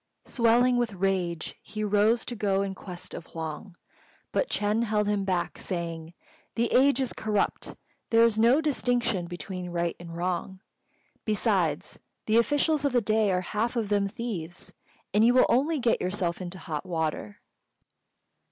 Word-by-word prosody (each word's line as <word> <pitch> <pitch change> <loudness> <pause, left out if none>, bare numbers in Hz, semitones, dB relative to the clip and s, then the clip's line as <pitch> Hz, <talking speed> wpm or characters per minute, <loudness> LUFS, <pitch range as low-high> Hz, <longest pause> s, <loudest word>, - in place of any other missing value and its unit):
Swelling 245 +1 +3
with 240 -3 0
rage, 180 -3 -1
he 215 0 -5
rose 210 +3 +2
to 240 - -4
go 200 -2 +1
in 195 -1 -3
quest 180 -2 -9
of 165 - -8
Huang, 165 +4 -6 0.6
but - - 0
Ch'êng 210 +3 +1
held 210 -1 +1
him 205 -1 0
back, 180 -3 -1
saying, 170 -2 -4 0.4
"The 235 0 0
age 275 +2 +5
is 260 -2 -1
corrupt: 210 -2 -1 0.3
there 230 0 +5
is 220 -2 +1
no 240 +7 +5
distinction 245 - 0
between 180 +1 -6
right 170 -1 -1
and 170 -1 -8
wrong. 180 +2 -2 0.6
Besides, 195 -8 0 0.3
the 220 +1 +3
officials 290 +5 +2
of 285 -3 +1
the 245 - +4
day 215 -1 +2
are 180 0 +1
half 220 +6 -2
of 225 -4 -1
them 200 -1 +2
thieves, 190 -6 -6 0.4
and 210 +2 +4
you 240 +2 +5
will 255 - +6
only 295 +6 +2
get 235 -2 +1
yourself 180 -2 -1
into 180 +1 -5
hot 155 -5 -5
water." 160 - -3
205 Hz, 160 wpm, -27 LUFS, 175-235 Hz, 0.6 s, will